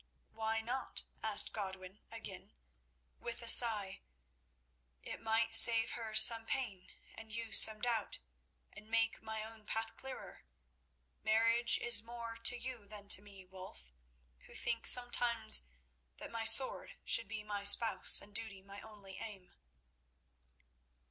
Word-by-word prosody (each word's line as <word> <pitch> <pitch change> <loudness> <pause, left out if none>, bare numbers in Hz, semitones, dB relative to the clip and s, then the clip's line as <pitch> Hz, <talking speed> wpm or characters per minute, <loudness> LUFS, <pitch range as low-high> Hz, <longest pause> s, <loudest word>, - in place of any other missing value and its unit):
"Why 225 0 -4
not?" 250 +3 -4 0.2
asked 220 -2 +1
Godwin 190 -1 -9
again, 225 -5 -11 0.7
with 235 0 -9
a - - -7
sigh; 215 -5 +4 1.0
"it - - -9
might 225 0 -2
save 225 0 +6
her 225 -2 -8
some 225 +1 +5
pain 215 -9 -6 0.2
and 225 -1 -13
you 225 0 -7
some 215 -1 +6
doubt, 230 -3 -3 0.6
and 215 0 -15
make 230 0 -2
my 220 -1 -7
own 220 0 -12
path 225 +1 -6
clearer. 265 - -11 0.8
Marriage 230 +2 +1
is 240 -3 0
more 230 0 -10
to 230 +2 0
you 240 -4 -9
than 205 -1 -13
to 190 - +3
me, 200 -2 -16
Wulf, 180 - -14 0.6
who - - -16
think 235 -1 -3
sometimes 240 - +3 0.5
that - - -11
my 230 -1 -6
sword 260 +3 +5
should 230 - -1
be 215 0 -8
my 205 -1 -7
spouse 210 +3 +5
and 205 - -19
duty 200 -3 -6
my 200 +1 -12
only 205 -3 -14
aim." 195 -5 -11
220 Hz, 135 wpm, -33 LUFS, 205-230 Hz, 1.0 s, save